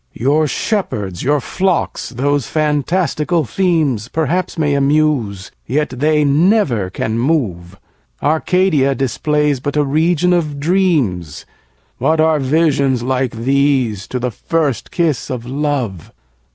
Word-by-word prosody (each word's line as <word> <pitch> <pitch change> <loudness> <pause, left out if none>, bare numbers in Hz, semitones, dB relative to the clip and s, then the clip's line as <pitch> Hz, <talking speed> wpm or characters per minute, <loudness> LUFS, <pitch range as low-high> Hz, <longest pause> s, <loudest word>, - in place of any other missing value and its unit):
5. - - -13
Your 150 +4 +3
shepherds, 105 - -2
your 145 +2 +1
flocks, 185 +6 -1
those 140 +1 -1
fantastical 155 +2 0
themes, 150 - 0
Perhaps 160 +6 -1
may 150 -3 +1
amuse, 140 -9 0 0.2
yet 150 +3 0
they 150 +4 +1
never 145 - +2
can 110 +4 -2
move: 100 - -1 0.4
Arcadia 155 -3 +2
displays 145 +2 0
but 145 +3 -3
a 150 - +3
region 165 +5 +2
of 155 -5 -1
dreams; 145 - 0 0.5
What 160 0 +1
are 160 -1 +3
visions 140 -3 +1
like 130 0 -1
these, 130 -4 +1
to 130 - -4
the 125 0 -2
first 150 +3 -2
kiss 160 -7 -1
of 125 -2 -4
love? 130 - -3
145 Hz, 125 wpm, -17 LUFS, 125-160 Hz, 0.5 s, Your